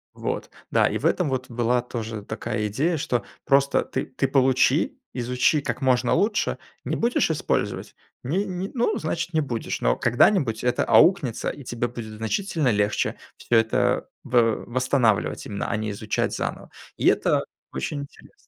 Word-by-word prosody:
Вот. - - -3 0.2
Да, - - +4
и - - -1
в - - -5
этом 180 -5 +2
вот 130 -1 -3
была 120 +1 +1
тоже 115 -3 -5
такая 110 0 -3
идея, 150 - 0
что 125 -4 -1 0.2
просто 140 0 +3
ты 130 - -3
ты 135 +1 -1
получи, 135 - +2
изучи 125 +4 +1
как - - -4
можно 125 -2 +2
лучше, 210 +1 +1 0.3
не - - -1
будешь 235 -7 +1
использовать, 155 - -2 0.3
ни 170 +11 0
ни, 190 -1 -4
ну, 240 -1 +1
значит, 165 +2 -3
не 160 - +3
будешь, 120 -6 -3
но - - +3
когда-нибудь 120 - +2
это 125 0 +1
аукнется, 165 - +4
и 145 - -8
тебе 120 -1 -2
будет 110 -3 -8
значительно 155 - -1
легче 105 -2 +1 0.2
всё 120 - -1
это 110 0 +2 0.2
в 115 -2 +2
восстанавливать 125 -3 +1
именно, 100 -1 -3
а - - 0
не 110 0 -3
изучать 105 +1 -2
заново. - - -4 0.3
И - - +1
это - - +3 0.3
очень 65 - -3
интересно. 140 - -13
125 Hz, 160 wpm, -24 LUFS, 115-150 Hz, 0.3 s, Да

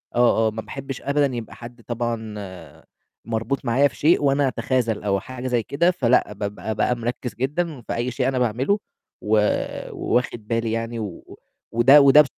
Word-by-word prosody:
آه، 120 -2 +4
آه، - - 0
ما 110 +1 -5
باحبش 135 +2 -7
أبدا 140 +1 +2
يبقى 115 -2 -6
حد 120 0 -11
طبعًا 105 - -5 0.4
مربوط 115 +5 -2
معايا 130 +4 +4
في 120 - -13
شيء، 155 0 +3
وأنا 140 0 +3
أتخاذل 125 -4 -1
أو 100 -1 +1
حاجة 130 +4 -7
زي 120 -3 +1
كده، 170 - +2
فلأ 125 - +2
بابقى 105 +2 -4
بقى 125 - +1
مركّز 120 -1 -4
جدًا 145 +3 -2
في - - -4
أي 120 +2 -1
شيء 125 +1 -1
أنا 130 -1 0
باعمله 125 - +1 0.4
و 110 +1 +2 0.5
وواخد 120 -3 -1
بالي 115 0 0
يعني 115 +1 -3 0.7
وده 130 +6 +7
وده 140 +2 +8
120 Hz, 165 wpm, -23 LUFS, 110-135 Hz, 0.7 s, وده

